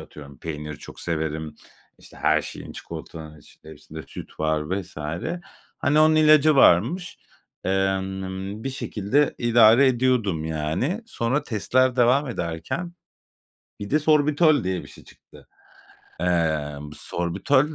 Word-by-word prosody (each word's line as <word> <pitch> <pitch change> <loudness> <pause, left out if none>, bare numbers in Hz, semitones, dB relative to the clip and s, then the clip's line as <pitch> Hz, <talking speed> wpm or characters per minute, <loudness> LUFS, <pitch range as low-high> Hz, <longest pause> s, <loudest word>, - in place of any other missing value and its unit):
atıyorum 70 -3 -12
peyniri 75 -2 -6
çok - - -11
severim, 80 -2 -3 0.4
işte - - -16
her 80 0 +2
şeyin, - - -8
çikolatanın 80 -1 -9
içinde, 80 - -17
hepsinde 80 +1 -10
süt 70 - -11
var 80 -1 +1 0.2
vs. 95 -2 -13 0.9
Hani, 150 +2 +3
onun 155 0 +5
ilacı 155 -1 +5
varmış. 135 - +3 0.5
Emm, 95 +1 -2
bir 135 - -2
şekilde 130 +3 0
idare 120 +2 +6
ediyordum 120 -10 +1
yani. 80 - -2
Sonra 130 - -1
testler 130 +3 +1
devam 130 +4 +3
ederken, 85 - -4 0.9
bir 100 - -6
de 150 - +3
sorbitol 150 - +3
diye 95 -1 -2
bir - - -13
şey - - -15
çıktı. - - -19 0.7
Eee, 80 -4 0 0.2
sorbitol 130 - 0
95 Hz, 120 wpm, -24 LUFS, -, 0.9 s, idare